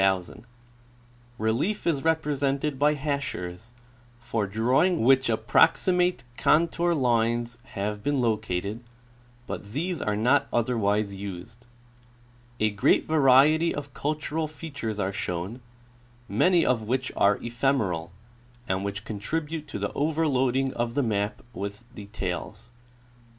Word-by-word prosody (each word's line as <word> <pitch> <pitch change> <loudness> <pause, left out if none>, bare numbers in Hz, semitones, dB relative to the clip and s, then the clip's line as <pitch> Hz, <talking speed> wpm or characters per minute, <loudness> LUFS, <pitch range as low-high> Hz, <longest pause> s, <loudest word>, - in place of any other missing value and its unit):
Relief 120 - 0
is 150 -5 +1
represented 145 -3 0
by 150 +1 +4
hachures, 125 -9 -4 0.5
for 115 -3 -2
drawing 125 - +2
which 130 +2 +5
approxi 115 +11 +3
mate 180 -4 +1
contour 170 +2 +2
lines 120 -2 +1 0.2
have 105 +1 -2
been 145 +5 0
located, 110 -2 -1 0.6
but 100 -3 -7
these 170 +3 -2
are 105 - 0
not 125 +7 +3
otherwise 105 -4 +1
used. 100 +4 -8 0.9
A 110 0 +2
great 100 -1 +3
variety 155 +2 +4
of 145 -2 -6
cultural 155 +1 -2
features 145 -8 -6
are 100 -1 -1
shown, 95 +6 -4 0.7
many 180 +2 +3
of 125 -3 +2
which 130 +4 -2
are 100 0 +4
ephemeral, 115 -9 -1 0.6
and 95 +1 -1
which 100 +1 -4
contribute 150 +9 -4
to 145 - -5
the - - -3
overloading 135 -4 +1
of 120 0 -2
the 145 - +2
map 105 -2 -1
with 100 +1 -6
details. 105 +2 -6
120 Hz, 115 wpm, -26 LUFS, 105-145 Hz, 0.9 s, which